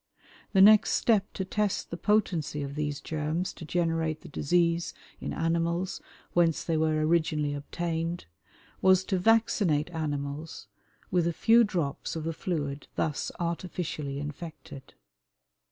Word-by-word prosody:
The 190 - +6
next 215 +1 +7
step 210 -4 +2
to 190 - -3
test 210 +1 -1
the - - -2
potency 170 -6 0
of 140 0 -5
these 150 -1 -2
germs 155 +3 -2
to 165 - -9
generate 165 -1 0
the - - -11
disease 170 +3 +1 0.2
in - - -4
animals 170 +2 -1 0.3
whence 170 -2 +3
they 165 - -1
were 155 -1 +2
originally 155 -3 +1
obtained, 165 +3 -3 0.6
was 190 0 +5
to 190 -1 -1
vaccinate 185 -7 +2
animals 150 -1 -4 0.5
with 175 -2 +2
a 170 - 0
few 230 +7 +5
drops 170 -11 -2
of 160 - -3
the 165 +1 -2
fluid 150 -4 -3
thus 150 -2 -1
artificially 170 -4 -3
infected. 145 -2 -8
165 Hz, 135 wpm, -28 LUFS, 150-180 Hz, 0.6 s, next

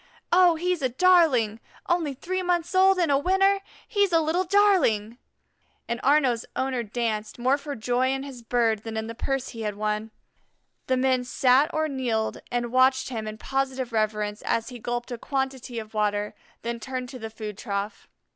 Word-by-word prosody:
Oh, 355 -1 +6
he's 355 0 -1
a 260 - +1
darling; 260 -8 +4 0.3
only 335 -6 0
three 370 +7 -3
months 350 -1 0
old 380 +1 +5
and 340 -5 +2
a 275 - +4
winner 390 +4 +3 0.3
he's 405 -3 +2
a 330 - +5
little 325 +3 +1
darling!" 340 - +3 0.7
and 235 +1 -3
Arnaux's 265 -5 +3
owner 260 -2 -1
danced, 220 -1 -3
more 255 +3 +2
for 285 0 -6
joy 245 +3 0
in 270 0 -2
his 270 -4 -9
bird 230 -2 +1
than 220 0 -6
in 220 - -2
the 230 - -6
purse 270 +2 -2
he 230 - -8
had 210 -2 -2
won. 215 +1 -2 0.8
The 260 - +2
men 255 -1 +2
sat 260 +4 +3
or 315 0 0
kneeled 245 -6 -2
and 240 -1 -1
watched 260 +1 +3
him 220 -4 -4
in 215 0 -6
positive 265 0 -2
reverence 210 -1 -1
as 230 +2 -1
he 245 -2 -9
gulped 240 +1 -4
a 240 - -5
quantity 265 -2 -3
of 220 -1 -6
water, 210 -1 0 0.3
then 235 0 -3
turned 255 +1 -5
to 255 - -9
the 225 -1 -6
food 215 -1 -7
trough. 200 -1 -4
255 Hz, 185 wpm, -25 LUFS, 225-295 Hz, 0.8 s, Oh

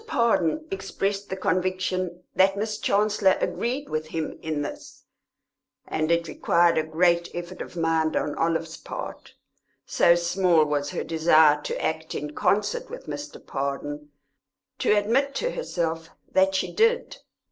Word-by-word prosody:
Pardon 235 - +1
expressed 195 +1 -3
the 190 - -2
conviction 185 -1 -1
that 195 +1 +4
Miss 215 +1 -2
Chancellor 205 -2 +2
agreed 260 +5 -2
with 155 0 -3
him 160 0 -4
in 155 -2 -2
this, 145 - -8 0.8
and 155 0 -1
it 170 0 +2
required 170 0 +3
a - - +1
great 170 +2 +2
effort 175 +1 -6
of - - -8
mind 165 -1 +1
on 145 - -1
Olive's 165 0 -1
part, - - -8 0.5
so 170 - +4
small 175 -2 +3
was 145 -1 -1
her - - -3
desire 160 -2 +4
to - - -4
act 160 0 -2
in 150 +1 -4
concert 485 - 0
with - - -9
Mr. 290 +1 -6
Pardon, 145 +2 -4 0.7
to - - +2
admit 235 +7 +2
to - - -1
herself 165 - -3 0.2
that 190 0 +3
she 190 - -1
did. 460 +2 +2
175 Hz, 145 wpm, -25 LUFS, 160-200 Hz, 0.8 s, that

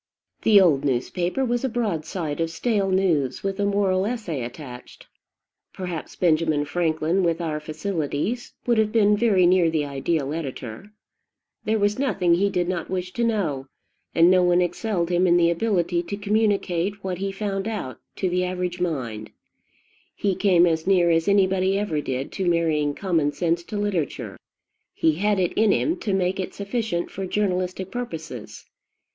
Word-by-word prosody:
The 210 -2 +6
old 155 -7 +4
newspaper 175 - -1
was 240 0 -1
a 265 - +1
broadside 170 -8 -2
of 165 - 0
stale 195 +4 0
news, 170 -9 +1
with 195 0 -2
a 200 - +2
moral 200 -1 +1
essay 210 - -3
attached. 125 0 -9 0.7
Perhaps 180 -4 -6
Benjamin 155 -3 +2
Franklin, 160 +3 0
with 170 -2 +1
our 160 -3 -2
facilities, 160 - -3
would 235 -2 +2
have 215 -1 +2
been 210 -2 +4
very 205 -5 +3
near 175 -1 +4
the 155 -2 0
ideal 140 +1 -1
editor. 135 - -6 0.7
There 220 +1 +1
was 205 +2 +1
nothing 195 -11 +2
he 195 +4 +2
did 180 -3 -1
not 175 -2 -3
wish 185 -1 -3
to 235 - -1
know; 170 - -1 0.5
and 170 +2 +6
no 185 -1 +5
one 180 0 +4
excelled 180 0 -1
him 180 +1 +3
in 175 0 +5
the 170 -1 +4
ability 175 -2 0
to 200 +4 -5
communicate 200 -2 0
what 185 -2 -3
he 195 0 -2
found 195 0 -3
out 130 - -4 0.2
to 190 - -1
the 180 0 0
average 180 -1 -3
mind. 120 -11 -3 0.9
He 200 -2 0
came 180 -2 +4
as 160 0 0
near 180 -3 +4
as 165 0 +2
anybody 190 -1 +3
ever 170 -7 -1
did 135 -1 -4
to 190 -3 -1
marrying 155 -4 +1
common 165 -7 0
sense 170 +2 0
to 210 - -5
literature: 200 -8 -2 0.6
he 160 -1 +2
had 210 0 +2
it 180 -2 0
in 220 -1 +3
him 315 - +1
to 225 -11 -3
make 190 +1 0
it 185 - -4
sufficient 200 -4 -2
for 195 0 -5
journalistic 185 -1 -1
purposes. 160 - -6
180 Hz, 165 wpm, -24 LUFS, 160-200 Hz, 0.9 s, The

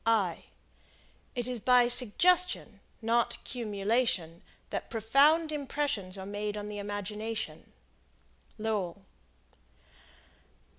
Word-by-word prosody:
It 245 -1 -2
is 250 -2 -3
by 250 +2 +5
suggestion, 250 - +3 0.2
not 235 +1 +1
cumulation, 210 -6 -1 0.3
that - - -4
profound 280 +9 +3
impressions 275 -10 -2
are 190 - -6
made 205 +1 -4
on 205 - -5
the 210 0 -6
imagination. 210 +2 -5 0.9
Lowell. 205 -4 -2
220 Hz, 85 wpm, -30 LUFS, 205-250 Hz, 0.9 s, by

